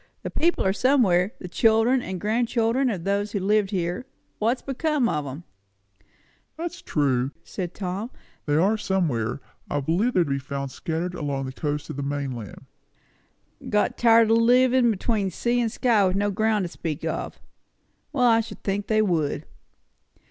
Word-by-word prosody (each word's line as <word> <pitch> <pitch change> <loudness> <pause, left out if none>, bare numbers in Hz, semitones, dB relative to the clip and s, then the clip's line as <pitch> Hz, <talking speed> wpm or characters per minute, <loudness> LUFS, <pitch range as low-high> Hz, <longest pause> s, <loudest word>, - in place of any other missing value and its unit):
The - - -4
people 340 - +1
are 190 - +3
somewhere 205 -5 +3
the 180 - -8
children 225 +6 +3
and 185 -5 -5
grandchildren 230 +4 +1
of 190 -7 -3
those 200 +2 -1
that 200 -3 -1
lived 205 0 +2
here; 180 +5 -2 0.3
what's 235 +4 0
become 280 -1 0
of 150 -8 -2
'em?" 140 +6 -7 1.1
"That's 345 +1 -5
true," 135 -4 0
said 180 -3 -6
Tom; 195 +4 -4 0.4
"they 145 - +2
are 195 +8 +3
somewhere. 140 - -1 0.3
I 145 - 0
believe 175 - +1
they 180 - +5
are - - +5
to 155 - -6
be 140 - 0
found 140 0 -5
scattered 165 +5 -3
along 140 -5 -3
the 130 - -5
coast 145 +2 -3
of - - -8
the - - -2
mainland." 135 -7 -5 1.0
"Got 210 - +1
tired 230 -1 +5
o' - - +6
livin' 245 +2 +4
between 210 -1 0
sea 240 +7 0
and 230 -2 0
sky 230 -4 +3
with 185 - 0
no 205 +1 +1
ground 215 0 +1
to 175 - -3
speak 160 -2 -5
of. - - -4 0.7
Well, 260 -4 +2
I 230 -1 +5
should 220 -2 -10
think 200 +1 -2
they 215 -1 +3
would!" 165 -7 0
200 Hz, 170 wpm, -25 LUFS, 160-230 Hz, 1.1 s, o